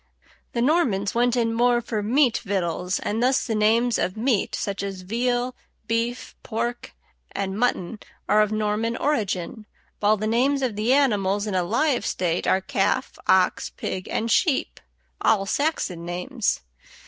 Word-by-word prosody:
The 235 - 0
Normans 245 - +2
went 240 +1 +2
in 230 -2 +1
more 240 +1 +3
for 225 -2 -3
meat 245 +3 +2
victuals, 180 -2 -1
and 220 +3 -2
thus 255 +2 +2
the 225 - -2
names 225 +3 +2
of 185 - -1
meat, 230 -2 +1
such 200 -1 -3
as 195 -2 -5
veal, 245 +5 -1 0.3
beef, 230 +2 -2
pork, 235 +1 -4 0.4
and 195 -1 -3
mutton, 220 -3 -1 0.3
are 215 - +4
of 210 0 +1
Norman 215 +2 -1
origin, 215 - -2 0.3
while 210 +1 +3
the 215 - -3
names 265 +5 +2
of 240 -5 -1
the 215 +4 0
animals 205 -7 +2
in 210 - -3
a 185 - +2
live 245 - +1
state 175 -2 -1
are 190 - +3
calf, 195 +1 -1
ox, 185 -1 +3
pig, 185 0 -5
and 230 +1 -1
sheep, 305 - +1 0.4
all 205 -3 +3
Saxon 195 - -1
names. 180 +8 -2
220 Hz, 155 wpm, -24 LUFS, 195-245 Hz, 0.4 s, are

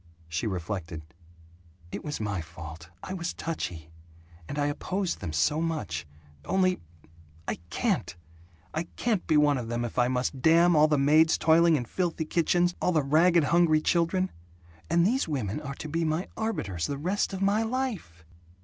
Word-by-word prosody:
She 85 +8 -2
reflected, 90 -4 -4 0.9
"It - - -5
was 150 - -4
my 100 -4 -2
fault. 80 0 -10
I 185 - -5
was 175 -2 -4
touchy. 85 - -5 0.6
And 145 - -4
I 145 - +1
opposed 180 +5 -2
them 90 -5 -4
so 145 - +1
much. 100 - -3 0.4
Only 185 - +1 0.7
I - - -2
can't! - - -1 0.6
I 160 +2 -2
can't 225 -6 -1
be 155 - +4
one 145 -2 +4
of 120 - -5
them 120 +1 -2
if 120 - -3
I 120 - +4
must 130 +1 -1
damn 170 +3 +5
all 155 0 +6
the 150 -1 +2
maids 155 +3 +4
toiling 165 +1 +5
in 125 -5 -1
filthy 170 +3 -2
kitchens, 175 +2 +2
all 180 - +2
the 155 -3 +2
ragged 165 +4 +4
hungry 165 0 +4
children. 175 +3 +1 0.6
And 170 0 +3
these 250 +3 +1
women 130 -5 -2
are 140 -2 -6
to 155 - -7
be 165 +2 -1
my 160 +3 -1
arbiters, 100 - -2
the 140 - -3
rest 185 +9 -1
of 190 0 -3
my 205 +3 +3
life!" 220 - -3
155 Hz, 170 wpm, -28 LUFS, 115-175 Hz, 0.9 s, all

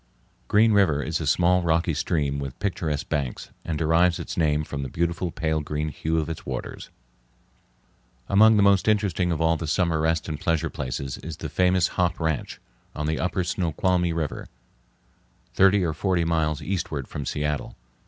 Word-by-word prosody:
Green 110 +2 +4
River 85 -8 +3
is 80 +2 -2
a 80 - -3
small 90 +4 +3
rocky 85 0 +1
stream 70 -2 -1
with 70 -1 -6
picturesque 80 -7 -2
banks, 70 -4 -3
and 80 -2 -3
derives 85 +2 +3
its - - -6
name 75 -2 +1
from 75 -1 -5
the 70 - -4
beautiful 85 +4 -1
pale 80 -1 -1
green 75 +1 -3
hue 80 +3 -2
of 80 - 0
its 80 -1 -6
waters. - - -6 1.4
Among 110 +2 +6
the 100 - +4
most 100 0 +4
interesting 100 -4 +1
of 80 - -1
all 80 0 +2
the 80 - -5
summer 80 0 +1
rest 80 0 0
and 75 -3 -4
pleasure 80 0 0
places 65 -1 -4
is 80 0 -7
the - - -5
famous 90 -1 +2
"Hop 90 -2 0
Ranch" 80 -3 -2 0.4
on 75 - -3
the 80 0 -1
upper 90 0 -1
Snoqualmie 90 +1 0
River, 80 -3 -3 1.1
thirty 95 0 +4
or 80 -2 0
forty 90 +2 0
miles 80 -2 0
eastward 85 -8 -3
from 75 - -5
Seattle. 75 +1 -3
80 Hz, 175 wpm, -25 LUFS, 75-90 Hz, 1.4 s, Among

